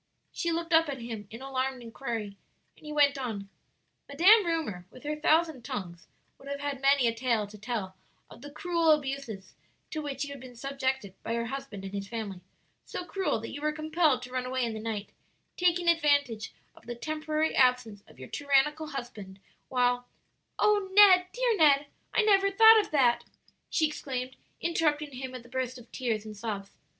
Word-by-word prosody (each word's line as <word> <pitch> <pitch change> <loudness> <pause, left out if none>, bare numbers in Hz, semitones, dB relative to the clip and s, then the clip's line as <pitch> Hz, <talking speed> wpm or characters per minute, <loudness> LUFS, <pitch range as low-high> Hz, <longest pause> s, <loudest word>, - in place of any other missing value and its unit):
She 340 - -2
looked 335 +1 -2
up 325 -1 +5
at 270 -2 -4
him 225 -4 -7
in 230 +4 -9
alarmed 265 -1 -2
inquiry, 225 -3 -5 0.4
and - - -22
he - - -5
went 285 -2 +3
on, 210 -6 -5 0.6
"'Madame 370 +7 +6
Rumor, 245 - -2
with 255 - -15
her 300 +1 -2
thousand 315 -2 +2
tongues,' 175 -6 -6 0.3
would 275 - -14
have 280 0 -4
had 285 -2 -4
many 275 -1 +4
a 230 - +2
tale 230 -2 0
to 205 +1 -13
tell 210 -3 -4 0.3
of - - -15
the 290 - -9
cruel 335 +2 0
abuse 275 -3 +1 0.6
to 310 - -3
which 285 -1 -3
you 285 - -8
had 280 - -8
been 255 -1 -11
subjected 265 -5 -2
by 230 - -3
your 235 0 -1
husband 250 -6 -6
and 195 - -7
his 200 -1 -4
family 205 -5 -5 0.4
so 360 - -6
cruel 380 - -1
that 225 - -7
you 290 - -7
were 305 0 +1
compelled 310 -3 +1
to 250 - -9
run 255 0 -1
away 260 -1 0
in 230 - -3
the 220 - -5
night, 215 -2 -4 0.4
taking 350 -1 +1
advantage 285 -9 +2 0.2
of - - -19
the 240 - -4
temporary 310 +3 -2
absence 250 -5 +2
of - - -18
your 130 0 -9
tyrannical 290 +2 +1
husband; 220 -9 -7 0.3
while 245 -1 +1 0.3
" - - -49
"O 410 -2 +2
Ned, 380 -3 +8
dear - - +1
Ned, 290 -3 +5 0.3
I 440 - +3
never 395 -2 +4
thought 445 +2 +8
of 420 - -1
that!" 255 -5 +3 0.4
she 315 - +2
exclaimed, 260 -4 -4 0.3
interrupting 305 -3 0
him 260 0 -6
with 250 -2 -9
a - - -15
burst 260 0 -3
of 245 -1 -15
tears 225 -5 -2
and 215 -1 -8
sobs. 200 -2 -5
270 Hz, 190 wpm, -29 LUFS, 230-310 Hz, 0.6 s, Ned